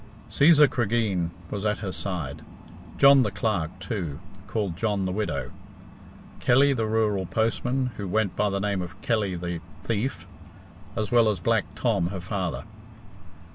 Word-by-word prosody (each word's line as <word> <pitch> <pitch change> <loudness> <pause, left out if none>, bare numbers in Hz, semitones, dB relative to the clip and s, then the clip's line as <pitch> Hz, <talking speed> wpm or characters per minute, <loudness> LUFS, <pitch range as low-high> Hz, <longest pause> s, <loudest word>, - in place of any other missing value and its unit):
Cæsar 150 0 +6
Cregeen 110 -8 0 0.2
was 100 -1 -3
at 105 -1 +1
her 100 -3 -4
side; 90 -8 -4 0.6
John 140 -1 +7
the 110 - +1
Clerk, 90 -7 -2
too, 85 - -4 0.3
called 100 -5 -2
John 100 0 0
the 95 - -1
Widow; 80 - -2 0.9
Kelly, 140 +3 +4
the 115 -4 -1
rural 105 -4 +1
postman, 125 +4 0
who 100 - -4
went 100 +1 0
by 105 0 +1
the 100 0 -1
name 100 -1 -1
of 90 +2 -8
Kelly 105 -5 0
the 85 -1 -4 0.2
Thief; 115 +4 -2 0.7
as 110 -3 -2
well 120 -2 +5
as 100 -4 -1
Black - - +1
Tom, 85 - +1
her 95 +1 -4
father. 90 -1 -3
105 Hz, 150 wpm, -26 LUFS, 90-115 Hz, 0.9 s, John